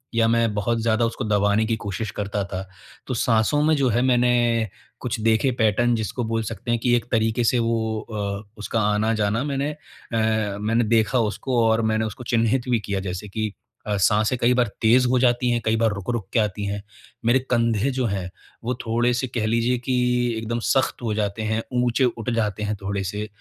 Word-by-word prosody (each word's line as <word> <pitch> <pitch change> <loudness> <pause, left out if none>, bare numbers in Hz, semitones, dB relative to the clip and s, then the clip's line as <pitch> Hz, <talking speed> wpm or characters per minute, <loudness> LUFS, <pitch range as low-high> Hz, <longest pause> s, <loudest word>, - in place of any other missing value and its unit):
या 115 -1 +4
मैं 115 -1 +2
बहुत 115 +3 0
ज़्यादा 115 +1 +2
उसको 115 +3 -3
दबाने 105 +1 +2
की 115 0 0
कोशिश 100 0 -4
करता 100 0 -2
था। 95 -1 -4 0.5
तो 130 - -2
साँसों 115 +4 +2
में 155 +1 +4
जो 135 -3 +2
है, 120 +1 +2
मैं 130 - +2
मैंने 120 -2 +2 0.3
कुछ 125 -1 -3
देखे 115 +4 +3
पैटर्न 120 +2 +3
जिसको 110 +2 -3
बोल 115 0 -1
सकते 120 +3 -4
हैं 120 - +1
कि 120 -1 +4
एक 120 - -4
तरीके 115 +1 +1
से 120 +2 +3
वो 115 -1 0
अ, 100 -2 -4
उसका 110 +1 -2
आना-जाना 110 +1 +1
मैंने 140 0 -1
अ, 110 -8 -2
मैंने 115 +3 +1
देखा 115 +3 +2
उसको 115 +2 0
और 110 0 +3
मैंने 110 0 +1
उसको 110 +3 -6
चिह्नित 120 +2 +1
भी 120 -2 +3
किया। 100 -2 -3
जैसे 90 +3 -5
कि 110 0 -3 0.3
अ, 105 -1 0
साँसें 105 +5 +2
कई 120 +1 +4
बार 125 -1 +3
तेज़ 125 +3 +5
हो 130 - +3
जाती 125 0 +2
हैं, 120 -1 +1
कई 110 - +2
बार 115 -1 +2
रुक-रुक 100 +1 -3
के 120 - +3
आती 105 -1 -1
हैं। 100 0 -3 0.4
मेरे 120 +3 +4
कंधे 115 0 +2
जो 130 -1 -1
हैं, 95 -3 -3 0.3
वो 120 +2 -1
थोड़े-से 120 +3 +1
कह 115 -2 -2
लीजिए 115 +2 +1
कि 125 +1 -1 0.4
एकदम 115 +1 -3
सख्त 135 -1 +1
हो 110 -2 -1
जाते 105 0 -2
हैं, 110 +1 0
ऊँचे 125 +1 +2
उठ 120 -1 -2
जाते 105 -2 -1
हैं 105 0 -1
थोड़े 100 0 -2
से, 105 +3 -4
115 Hz, 205 wpm, -23 LUFS, 105-120 Hz, 0.5 s, तेज़